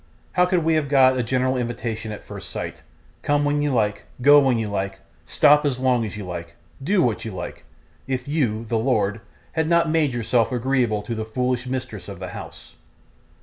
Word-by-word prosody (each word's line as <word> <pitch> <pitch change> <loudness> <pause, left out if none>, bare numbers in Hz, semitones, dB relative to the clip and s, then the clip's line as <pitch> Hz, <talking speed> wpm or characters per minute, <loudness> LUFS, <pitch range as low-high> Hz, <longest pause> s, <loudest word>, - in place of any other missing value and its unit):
How 180 0 +3
could 180 -2 +1
we 165 +1 +2
have 155 -3 +1
got 130 -2 +5
a - - +3
general 130 +2 0
invitation 115 -2 -3
at 105 - -8
first - - -7
sight - - -6 0.4
come 145 0 +1
when 145 0 +1
you 145 - +1
like, 105 -5 0
go 145 +3 +7
when 135 -4 +3
you 110 -1 -1
like, 100 -1 -3 0.3
stop 150 - +5
as 140 -4 0
long 130 -2 +2
as 105 -1 -6
you 105 - -6
like, 85 -1 -7 0.3
do 190 +3 +3
what 115 -3 0
you 115 - -4
like 95 -4 -7 0.4
if 130 +1 -3
you, 120 -7 0
the 115 0 0
lord, 110 -4 0 0.3
had 160 -1 0
not 170 -1 +3
made 155 -3 +2
yourself 120 0 +1
agreeable 120 -4 0
to 115 - -4
the 110 -1 -3
foolish 125 +2 -1
mistress 130 -7 -5
of - - -7
the - - -6
house? - - -10
125 Hz, 200 wpm, -23 LUFS, 110-145 Hz, 0.4 s, go